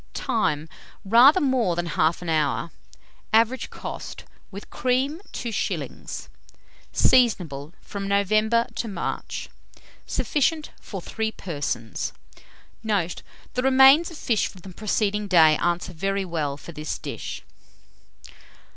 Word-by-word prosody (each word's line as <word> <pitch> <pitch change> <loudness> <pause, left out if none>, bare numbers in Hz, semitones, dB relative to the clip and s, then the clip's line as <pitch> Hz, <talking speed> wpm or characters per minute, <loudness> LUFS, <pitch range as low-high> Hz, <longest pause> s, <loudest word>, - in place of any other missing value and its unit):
Time. 160 -8 0 0.4
Rather 245 - +7
more 255 - +1
than 175 0 -2
1/2 165 +3 +1
hour. 155 0 0 0.6
Average 230 +4 +3
cost, - - -7 0.3
with 200 +1 -10
cream, 260 +6 0
2s. 235 -3 -4 0.6
Seasonable 175 - +2
from 200 -1 -5
November 215 +4 +2
to 230 - -2
March. 190 -5 -4 0.6
Sufficient 305 +2 0
for 195 -4 -7
3 220 0 -2
persons. 145 - -4 0.7
Note. 200 -6 -1 0.3
The 250 - 0
remains 265 +5 +6
of 335 - -10
fish 230 -7 +1
from 185 - -12
the 190 - -10
preceding 210 +1 -1
day 160 -5 +6
answer 175 +1 -1
very 195 +3 -1
well 155 -5 -2
for 170 - -10
this 155 -1 -4
dish. - - -6
200 Hz, 110 wpm, -24 LUFS, 170-235 Hz, 0.7 s, Rather